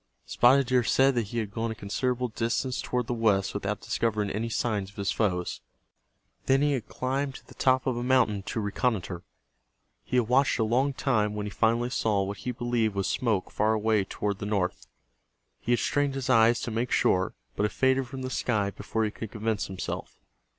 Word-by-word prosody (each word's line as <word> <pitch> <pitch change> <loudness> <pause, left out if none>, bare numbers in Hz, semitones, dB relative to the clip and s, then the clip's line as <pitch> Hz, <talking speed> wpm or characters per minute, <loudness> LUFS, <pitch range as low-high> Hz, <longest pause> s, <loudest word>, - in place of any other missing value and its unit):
Spotted 135 +3 +4
Deer 125 0 +2
said 135 +5 +4
that 120 -4 -1
he 120 - -5
had 110 -3 -2
gone 115 +2 -2
a 110 - -4
considerable 125 +4 -1
distance 115 +3 -1
toward 125 -1 -1
the 120 - -2
west 105 -4 +2
without 100 0 -3
discovering 105 -3 -1
any 115 +3 -2
signs 105 -4 -1
of 100 - -19
his 100 -1 -1
foes. 90 -5 -1 0.9
Then 135 +1 +4
he 145 - +3
had 130 -6 -2
climbed 135 +1 -2
to - - -11
the - - -15
top 130 -1 +2
of 130 - 0
a 120 - -3
mountain 125 -5 +2
to - - -2
reconnoiter. 100 -4 -1 0.8
He 125 - -1
had 120 -3 +2
watched 135 +3 +3
a 115 - +2
long 130 +5 +1
time 105 -6 0
when 105 -1 -3
he 105 - -5
finally 115 +3 +1
saw 105 -6 +1
what 100 +1 -4
he 125 - -4
believed 120 -3 -1
was 100 -1 0
smoke 105 0 0
far 110 +1 +2
away 110 -1 +2
toward 100 +1 -3
the 100 - -4
north. 95 -4 -1 0.7
He 120 - -3
had - - +3
strained 145 -1 0
his 135 0 -1
eyes 115 -1 +5
to 120 - -3
make 115 +3 -1
sure, 95 0 +2 0.2
but 105 - +1
it - - -9
faded 130 0 +2
from 130 +1 -7
the 130 - -4
sky 105 -6 0
before 110 +2 -2
he 105 - 0
could 110 0 -7
convince 110 -1 -2
himself. 95 -1 -6
115 Hz, 205 wpm, -27 LUFS, 105-125 Hz, 0.9 s, eyes